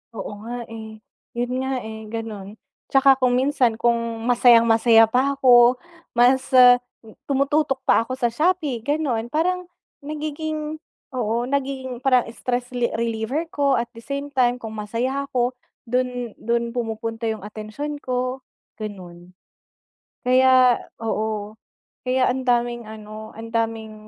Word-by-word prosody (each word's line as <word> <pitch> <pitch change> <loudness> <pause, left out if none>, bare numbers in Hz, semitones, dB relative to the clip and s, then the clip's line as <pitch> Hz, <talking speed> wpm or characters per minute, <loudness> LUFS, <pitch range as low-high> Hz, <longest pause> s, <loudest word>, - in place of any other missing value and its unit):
Oo 205 -1 -6
nga, 240 +1 -5
eh. 220 -1 -9 0.3
Yun 245 +1 -2
nga, 265 0 -2
eh, 220 0 -8
gano'n. 215 -2 -6 0.3
Tsaka 270 0 +5
kung 250 -1 +2
minsan, 255 -3 +2
kung 230 -1 -1
masayang-masaya 230 -1 +5
pa 270 +3 +2
ako 245 -2 +6 0.4
mas, 250 +2 +4
ah, 250 -1 +8 0.5
tumututok 275 0 +1
pa 230 - +3
ako 255 - -3
sa 240 -2 0
Shopee, 305 -2 0
gano'n. 260 -3 -1
Parang 360 +6 -1 0.3
nagiging 305 +1 -4 0.4
oo, 235 0 -1
nagiging 265 -2 -3
parang 255 -3 +3
stress 245 +1 -3
le 245 -1 -1
reliever 230 +6 -1
ko. 280 -2 +2
At 235 0 -2
the 230 -2 -13
same 280 +3 -5
time, 250 -3 +2
kung 225 -2 -7
masaya 245 +6 -2
ako, 245 -2 0 0.4
dun 250 -1 -1
dun 235 +1 -1
pumupunta 225 -1 -3
yung 220 -3 -3
atensiyon 215 +8 -6
ko, 255 0 -2 0.4
gano'n. 180 -4 -9 0.9
Kaya 255 0 +5 0.2
oo, 215 -1 -3 0.5
kaya 255 0 +2
ang 260 +1 -2
daming 240 -1 0
ano, 215 0 -10
ang 225 +1 -9
daming 225 -1 -2
245 Hz, 130 wpm, -22 LUFS, 225-265 Hz, 0.9 s, ah